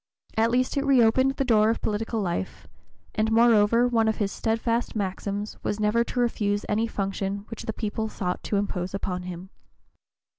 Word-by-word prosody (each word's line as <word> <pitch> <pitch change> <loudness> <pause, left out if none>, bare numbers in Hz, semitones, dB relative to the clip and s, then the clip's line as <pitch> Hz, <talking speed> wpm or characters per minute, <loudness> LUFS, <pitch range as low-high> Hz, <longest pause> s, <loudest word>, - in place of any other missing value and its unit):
At 225 +1 +3
least 255 +3 +1
it 280 - +1
reopened 260 0 +4
the 275 -1 -1
door 220 -3 +4
of 230 - 0
political 220 +2 -1
life, 170 - -3 0.5
and 215 +1 0
moreover 230 0 +5
one 225 -2 +2
of 220 - +2
his 200 -2 -1
steadfast 230 +1 -1
maxims 200 +1 -3
was 205 - -2
never 215 +2 +2
to 245 - -4
refuse 205 -4 0
any 220 +2 +1
function 195 -1 -3
which 225 - -7
the - - 0
people 220 0 -3
sought 180 -4 -3
to 205 - 0
impose 190 -2 -2
upon 180 -2 -3
him. 180 +1 -8
215 Hz, 175 wpm, -26 LUFS, 200-230 Hz, 0.5 s, moreover